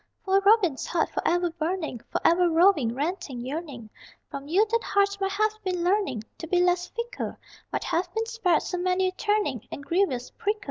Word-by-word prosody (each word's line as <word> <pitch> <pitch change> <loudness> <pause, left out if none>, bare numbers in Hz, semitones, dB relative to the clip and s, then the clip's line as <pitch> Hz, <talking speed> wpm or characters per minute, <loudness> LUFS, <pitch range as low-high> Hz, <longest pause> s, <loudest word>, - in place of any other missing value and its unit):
Poor 390 +1 +3
Robin's 395 -8 +3
heart, 335 -2 0
forever 350 0 0
burning, 320 - -3
Forever 350 +1 +3
roving, 325 -8 +4
ranting, 300 -2 -3
yearning, 265 -2 -6 0.4
From 280 0 -6
you 380 +8 +4
that 460 0 +2
heart 400 0 +2
might 390 0 0
have 430 +1 +2
been 365 -2 -1
learning 365 - +1 0.2
To 330 - -6
be 360 +2 +2
less 355 0 +2
fickle! 470 +1 -5 0.3
Might - - -2
have 350 +1 -1
been 450 0 0
spared 450 -8 +1
so 360 - -3
many 365 +1 +1
a - - -6
turning 385 - -1
And 280 - -7
grievous 305 -9 0
prickle! 420 +1 -2
360 Hz, 180 wpm, -26 LUFS, 310-395 Hz, 0.4 s, roving